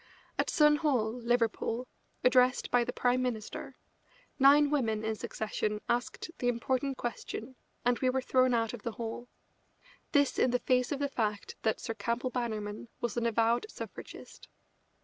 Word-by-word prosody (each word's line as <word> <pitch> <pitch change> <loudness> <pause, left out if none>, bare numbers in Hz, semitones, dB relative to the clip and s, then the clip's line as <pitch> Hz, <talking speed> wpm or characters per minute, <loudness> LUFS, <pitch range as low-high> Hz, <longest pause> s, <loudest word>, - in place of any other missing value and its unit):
At - - +2
Sun 300 -1 +5
Hall, 255 -8 +1
Liverpool, 240 0 0 0.4
addressed 250 0 +4
by 245 -1 +4
the 245 - -3
Prime 250 +1 +1
Minister, 230 -4 -4 0.6
nine 285 +2 +6
women 225 -7 +1
in 220 0 0
succession 210 0 -3
asked 245 +7 -2
the 245 - 0
important 260 +3 0
question, 240 +1 -5 0.3
and 245 0 +3
were 260 0 +2
thrown 255 -1 +3
out 225 -1 0
of 240 - -7
the 235 - -4
hall; 230 +1 -5 0.8
this 285 -3 +3
in 255 - +4
the 250 - +2
face 250 0 +1
of 290 - 0
the 285 0 0
fact 215 -6 -2
that 220 - +1
Sir 225 - -4
Campbell 235 +4 -2
Bannerman 215 -3 -3
was 240 - -2
an 235 -1 +1
avowed 230 - +2
suffragist. - - -9
245 Hz, 155 wpm, -31 LUFS, 225-255 Hz, 0.8 s, nine